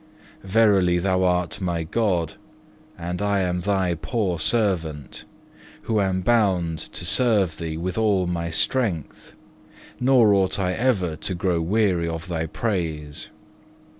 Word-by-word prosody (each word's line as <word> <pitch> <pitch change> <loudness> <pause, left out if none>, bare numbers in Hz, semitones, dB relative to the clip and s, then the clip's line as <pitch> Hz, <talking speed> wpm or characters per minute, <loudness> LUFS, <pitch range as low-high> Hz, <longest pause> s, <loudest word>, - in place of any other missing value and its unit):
Verily 95 -3 +3
Thou 95 +1 +1
art 90 0 0
my 85 -3 -1
God, 85 -3 0 0.6
and 90 +2 -4
I 100 -1 +1
am 90 -1 -1
Thy 95 -1 0
poor 90 - -2
servant, 85 - -1 0.6
who 110 -2 +1
am 95 -1 0
bound 90 -7 +1
to - - -6
serve 105 -10 +2
Thee 80 -2 -4
with 90 +4 -3
all 100 -4 +2
my 85 -1 -2
strength, 85 - -2 0.6
nor 125 -5 +5
ought 95 -2 +2
I 90 -2 0
ever 100 -8 0
to 95 - -3
grow 85 -1 0
weary 90 -2 +1
of 80 +1 -5
Thy 80 -2 -2
praise. 80 -8 -3
90 Hz, 135 wpm, -23 LUFS, 85-105 Hz, 0.6 s, nor